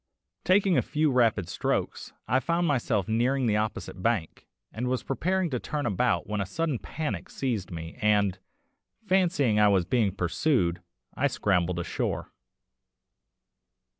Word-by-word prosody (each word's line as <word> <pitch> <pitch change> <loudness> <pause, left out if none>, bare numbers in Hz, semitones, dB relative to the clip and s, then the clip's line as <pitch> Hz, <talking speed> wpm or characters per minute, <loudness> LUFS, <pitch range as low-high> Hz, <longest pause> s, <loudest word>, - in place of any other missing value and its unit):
Taking 185 0 +4
a - - +2
few 155 -1 0
rapid 115 -7 +2
strokes, - - -2 0.2
I 130 - +3
found 170 +6 0
myself 120 - 0
nearing 125 +4 +1
the 105 -2 +2
opposite 105 -3 -3
bank, 110 -7 -1 0.3
and 120 +3 -3
was 130 0 -1
preparing 180 +5 -1
to 125 - -1
turn 150 +3 -3
about 120 +5 +1
when 105 -1 -2
a - - -1
sudden 155 - -1
panic 155 -2 -4
seized 115 -9 -2
me, 80 +4 -8
and, 105 -3 +2 0.7
fancying 170 - +2
I 105 - +6
was 95 -4 +3
being 105 -3 +1
pursued, 90 - +1 0.3
I - - +1
scrambled 90 -3 0
ashore. 85 - -3
120 Hz, 140 wpm, -27 LUFS, 100-145 Hz, 0.7 s, I